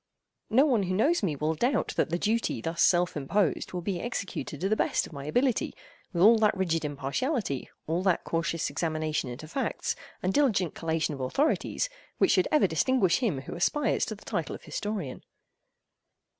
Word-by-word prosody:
No 255 +6 +5
one 250 -8 +3
who 185 -1 -1
knows 295 - +3
me 165 -7 0
will 155 +3 0
doubt 245 - +1
that - - +1
the 170 - 0
duty 220 +5 0
thus 165 +1 -2
self 175 0 +4
imposed 155 +5 0
will 180 -1 -4
be 185 -2 -2
executed 200 - -4
to 190 - 0
the 215 - +2
best - - +1
of - - -12
my 140 -1 -7
ability, 245 - +1 0.4
with 175 -2 +1
all 225 +2 +7
that 210 -2 +3
rigid 165 -4 0
impartiality, 145 - -2 0.2
all 165 +3 0
that 185 -3 +2
cautious 165 -2 -1
examination 155 -2 -1
into 130 +6 -7
facts, 265 - -2 0.3
and 185 +1 +1
diligent 220 - +2
collation 160 -2 -1
of 135 - -6
authorities, 285 - 0 0.3
which - - +4
should - - +3
ever 300 -7 +5
distinguish 190 +3 +2
him 195 - 0
who - - -8
aspires 290 - +1
to - - -5
the - - -17
title - - -2
of - - -12
historian. 200 -11 -4
180 Hz, 185 wpm, -28 LUFS, 155-225 Hz, 0.4 s, all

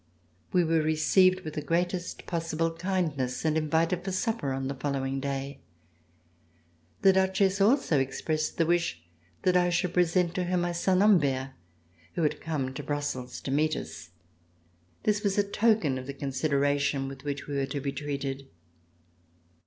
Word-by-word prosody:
We 180 -1 +4
were 165 -1 +2
received 185 +4 +3
with 155 -3 -6
the 150 - -3
great 175 +3 0
est 180 -1 -5
possible 165 -1 -1
kindness 165 -8 -2
and 155 -1 +2
invited 165 +3 +1
for 190 - -3
supper 185 - -1
on 135 0 -2
the 140 - -2
following 135 -1 -2
day. 140 0 -4 1.4
The 195 - +7
Duchesse 190 +1 +2
also 205 - +3
expressed 155 +4 -2
the 165 - +3
wish 170 - 0 0.4
that 180 -1 +3
I 180 0 +4
should 175 0 0
present 175 0 +2
to 185 -1 -1
her 180 +1 0
my 175 0 0
son, 185 +2 +2
Humbert, 140 -10 +3 0.6
who 170 - 0
had 150 - 0
come 140 -5 -2
to - - -5
Brussels 145 -4 -3
to 135 - -4
meet 155 +2 +2
us. 80 0 -7 0.9
This 210 -1 +1
was 200 -1 0
a 205 - +4
token 205 - +2
of 130 - -9
the 140 - -5
consideration 140 0 0
with 135 0 -9
which 145 -1 -4
we 145 - -6
were 135 -1 0
to 140 +1 -3
be 140 0 -2
treated. 140 -1 -4
155 Hz, 165 wpm, -28 LUFS, 140-180 Hz, 1.4 s, The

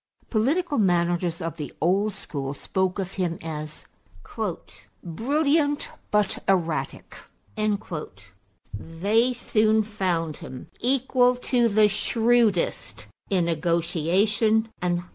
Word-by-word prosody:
Political 285 +7 +1
managers 175 -3 +1
of 165 0 -4
the 150 -3 -5
old 195 +5 +2
school 145 -7 -5
spoke 190 +4 -1
of 190 -1 -4
him 170 -2 -1
as 155 -1 -6 1.2
"brilliant 285 - +1 0.2
but 210 -2 +1
erratic"; 170 -5 -1 1.6
they 200 - +1
soon 220 -2 +2
found 180 -7 -2
him 130 - -10
equal 250 0 +3
to 245 -1 +1
the 210 0 +5
shrewdest 225 -1 +1 0.2
in 185 -4 +2
negotiation 175 +7 +1
and 180 -1 +1
action. 175 +1 -8
195 Hz, 100 wpm, -25 LUFS, 170-230 Hz, 1.6 s, the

